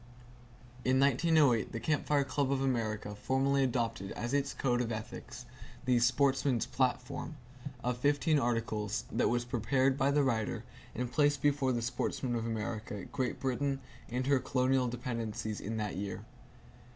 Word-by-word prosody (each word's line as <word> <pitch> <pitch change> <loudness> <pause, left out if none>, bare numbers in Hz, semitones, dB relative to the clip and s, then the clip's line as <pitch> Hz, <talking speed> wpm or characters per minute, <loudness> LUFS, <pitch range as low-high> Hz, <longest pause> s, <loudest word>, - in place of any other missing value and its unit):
In 130 +1 +3
1908 140 -3 +3
the 115 - -2
Camp 150 +4 0
Fire 145 -1 +3
Club 140 0 0
of 135 - +1
America 110 -6 -1
formally 135 +5 +1
adopted, 115 -6 -1
as 120 +2 -4
its 140 -1 +1
code 125 -2 0
of 120 -1 -2
ethics, 115 +2 -6 0.4
the 125 -1 +4
"Sportsman's 130 0 +2
Platform" 130 +4 -1 0.5
of 125 0 -1
fifteen 145 +3 +3
articles 115 -3 -1
that - - +2
was 120 0 0
prepared 130 +3 +1
by 135 - +3
the 145 0 +3
writer 115 -5 0 0.3
and 125 +1 -2
placed 145 -2 +2
before 140 -2 +3
the 120 -2 -1
sportsmen 120 +1 -2
of 115 -1 -1
America, 105 -2 -4
Great 130 -3 -2
Britain 135 +1 -1 0.3
and 125 +2 -1
her 140 -1 +4
colonial 130 0 +1
dependencies 115 -3 -3
in 110 +3 -3
that 105 -3 -2
year. 100 0 -4
125 Hz, 150 wpm, -32 LUFS, 115-135 Hz, 0.5 s, the